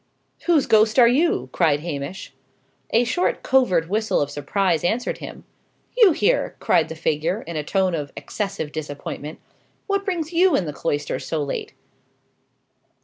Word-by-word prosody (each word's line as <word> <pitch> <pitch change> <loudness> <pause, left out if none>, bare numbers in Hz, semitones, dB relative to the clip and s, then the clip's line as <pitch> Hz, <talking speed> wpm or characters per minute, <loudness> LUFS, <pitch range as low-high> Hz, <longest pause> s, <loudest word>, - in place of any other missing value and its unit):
"Whose 325 -5 +4
ghost 215 +1 +4
are 240 -2 +8
you?" 245 - +1
cried 150 -4 +2
Hamish. 150 +2 -6 0.6
A 230 - +3
short 350 +9 -1
covert 185 - +2
whistle 220 +4 0
of 145 0 -1
surprise 165 +4 0
answered 230 +7 -1
him. - - -9 0.5
"You 450 -6 +7
here!" 415 +10 +1
cried 160 -1 +2
the 160 - -6
figure, 160 +5 -1
in 170 - -7
a 150 - -2
tone 190 +3 0
of 145 -4 -3
excessive 195 -7 -4
disappointment. 150 0 -6 0.5
"What 400 -1 0
brings 350 -4 -3
you 355 -1 +4
in 185 - +1
the 150 - -5
cloisters 145 -1 -3
so 155 -2 -1
late?" 140 - -5
185 Hz, 150 wpm, -22 LUFS, -, 0.6 s, are